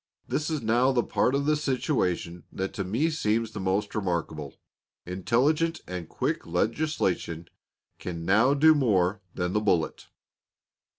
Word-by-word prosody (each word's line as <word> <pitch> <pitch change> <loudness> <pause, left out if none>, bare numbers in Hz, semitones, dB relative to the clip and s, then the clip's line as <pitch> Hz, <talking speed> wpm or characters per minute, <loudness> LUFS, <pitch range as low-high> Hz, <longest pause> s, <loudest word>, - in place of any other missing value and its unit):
This 155 +2 -1
is 155 -5 -2
now 120 +4 +3
the 120 -3 +2
part 130 - +1
of 140 0 0
the 155 +1 +3
situation 125 - -1
that 95 +1 -4
to 100 - -3
me 120 - 0
seems 115 -6 0
the 105 - -6
most 95 +2 -1
remarkable. 85 -8 -3 0.5
Intelligent 135 - +1
and 90 -3 -6
quick - - -2
legislation 90 - -1 0.5
can 85 -2 -5
now 110 +9 +4
do 155 +2 +6
more 100 - +2
than 90 0 -1
the 105 - +2
bullet. 90 -6 0
105 Hz, 140 wpm, -27 LUFS, 90-140 Hz, 0.5 s, do